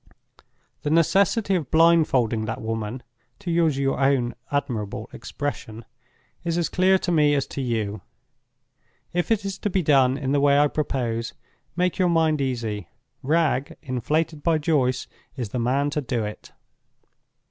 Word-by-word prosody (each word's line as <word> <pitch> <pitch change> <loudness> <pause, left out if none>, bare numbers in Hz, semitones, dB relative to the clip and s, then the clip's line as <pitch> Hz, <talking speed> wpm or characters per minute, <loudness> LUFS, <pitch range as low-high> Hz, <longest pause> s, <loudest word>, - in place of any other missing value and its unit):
The 145 - -2
necessity 195 +6 +3
of 165 -8 -1
blindfolding 155 -9 +3
that 115 - -4
woman 115 +2 -4 0.3
(to 185 -4 -5
use 165 -4 +2
your 135 -1 0
own 135 -3 +2 0.2
admirable 115 -6 -2
expression) 120 -3 -6 0.6
is 170 -1 -1
as 170 - 0
clear 185 +1 +3
to 180 - -2
me 150 -3 +4
as 140 -2 0
to 140 - -4
you. 110 -4 -2 1.1
If 175 0 -1
it 220 -3 +1
is 195 -1 -4
to 205 - -1
be 190 -1 0
done 135 -3 +4
in 135 -2 -2
the 145 - +3
way 140 0 +4
I 145 0 +4
propose, 120 -6 -2 0.4
make 180 +1 0
your 180 -1 +3
mind 160 -3 +2
easy—Wragge, 130 - -2
inflated 150 +4 -1
by 165 +1 +2
Joyce, 135 -5 +1 0.3
is 120 -6 -4
the 125 - -3
man 135 +5 +1
to 150 - -1
do 120 -4 -2
it. 105 - -8
140 Hz, 150 wpm, -24 LUFS, 120-165 Hz, 1.1 s, me